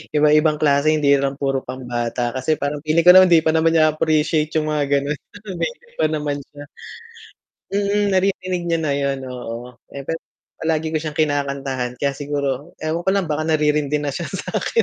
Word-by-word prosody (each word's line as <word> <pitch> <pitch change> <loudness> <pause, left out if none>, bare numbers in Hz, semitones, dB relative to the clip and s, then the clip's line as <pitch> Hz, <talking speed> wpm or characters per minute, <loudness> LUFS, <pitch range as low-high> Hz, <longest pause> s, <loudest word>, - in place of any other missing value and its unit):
iba-ibang 150 +1 +4
klase 145 +1 +3
hindi 145 -2 +3
lang 135 0 -2
puro 135 -1 0
pambata 120 -1 -3
kasi 130 +5 0
parang 145 +1 -2
feeling 160 +2 +2
ko 180 - +11
naman 185 0 +8
hindi 165 -2 +6
pa 160 - +3
naman 160 0 +3
niya 155 -1 +5
appreciate 155 0 +1
'yung 155 -1 +1
mga 150 -1 +1 0.2
gano'n, 145 +1 -3 0.4
baby 480 -1 -4
pa - - +3
naman 150 -2 -2
siya. 145 +1 -12 1.1
Mm, 205 +1 +1
naririnig 185 -1 0
niya 165 -1 +1
na 155 -3 0
'yun, 140 -1 -1
oo. 125 0 -7 0.2
Eh, 140 - -6
pero 165 - -2 0.4
palagi 160 -1 -1
ko 160 - -1
siyang 155 -1 -5
kinakantahan 140 -4 -1
kaya 140 - +2
siguro 145 +1 -3
ewan 160 +2 -1
ko 190 - +4
lang 195 -3 0
baka 155 +1 -1
naririndi 150 -2 +1
na 145 - -1
siya 170 +5 -4
sa'kin. 205 - -1
150 Hz, 180 wpm, -20 LUFS, 140-160 Hz, 1.1 s, ko